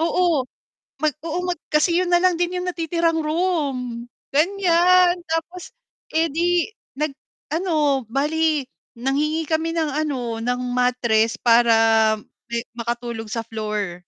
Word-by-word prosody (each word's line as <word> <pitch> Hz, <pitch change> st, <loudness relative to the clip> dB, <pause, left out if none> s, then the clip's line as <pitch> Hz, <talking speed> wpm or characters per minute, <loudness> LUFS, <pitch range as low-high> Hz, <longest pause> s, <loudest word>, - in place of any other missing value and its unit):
Oo, 335 Hz, -4 st, +2 dB, 0.6 s
mag 305 Hz, -3 st, +2 dB
oo 335 Hz, +2 st, -2 dB
mag 350 Hz, -, -2 dB
kasi 305 Hz, +3 st, +3 dB
yun 360 Hz, -, -1 dB
na 350 Hz, -, +5 dB
lang 365 Hz, +1 st, +3 dB
din 350 Hz, +1 st, -1 dB
yung 360 Hz, -, -3 dB
natitirang 335 Hz, -1 st, 0 dB
room, 285 Hz, -8 st, -2 dB, 0.2 s
ganyan. 360 Hz, +2 st, +4 dB, 0.2 s
Tapos, 335 Hz, +2 st, -3 dB, 0.4 s
edi 330 Hz, +2 st, +1 dB, 0.3 s
nag 300 Hz, -1 st, -1 dB, 0.4 s
ano, 305 Hz, -6 st, +1 dB
bale 300 Hz, +2 st, +1 dB, 0.3 s
nanghingi 300 Hz, +6 st, 0 dB
kami 320 Hz, +1 st, 0 dB
ng 320 Hz, -2 st, +1 dB
ano 245 Hz, -6 st, -3 dB
ng 245 Hz, +2 st, -1 dB
mattress, 240 Hz, -3 st, +2 dB
para 235 Hz, -1 st, +4 dB, 0.8 s
me 235 Hz, -, -2 dB, 0.2 s
makatulog 235 Hz, -1 st, -4 dB
sa 230 Hz, 0 st, -3 dB
floor. 210 Hz, -5 st, -3 dB
305 Hz, 125 wpm, -22 LUFS, 245-340 Hz, 0.8 s, na